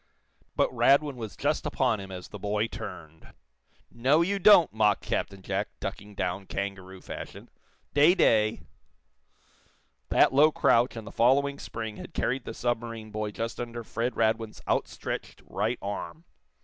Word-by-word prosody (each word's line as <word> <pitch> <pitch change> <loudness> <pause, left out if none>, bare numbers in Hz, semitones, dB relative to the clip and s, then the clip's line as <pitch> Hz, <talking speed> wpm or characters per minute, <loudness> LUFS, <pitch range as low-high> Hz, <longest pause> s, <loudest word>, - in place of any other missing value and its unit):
But - - +2
Radwin 135 +4 +3
was 110 -4 -7
just - - 0
upon 120 -5 +1
him 95 0 -8
as 90 -1 -8
the 105 - -9
boy 105 +2 0
turned. 80 -7 -9 0.6
"No, 135 +7 +3
you 200 +3 -1
don't!" 180 - +7
mocked 105 -2 +2
Captain 100 -1 -3
Jack, 100 +2 -2
ducking 100 +1 -6
down, 90 +1 -3
kangaroo 95 -1 -5
fashion. - - -9 0.4
"Day 150 +6 +6
day!" 110 - +3 1.5
That - - +4
low 150 +3 +6
crouch 120 -4 +3
and 115 -2 -7
the - - -9
following 140 +4 +2
spring 110 -2 -6
had - - -10
carried 130 +1 -1
the 115 - -6
submarine 115 -2 -3
boy 105 0 -3
just 115 +2 -5
under 120 -1 -5
Fred 115 +2 -3
Radwin's 110 -1 0
outstretched - - -3
right - - -1
arm. 100 +10 -5
115 Hz, 150 wpm, -28 LUFS, 100-125 Hz, 1.5 s, don't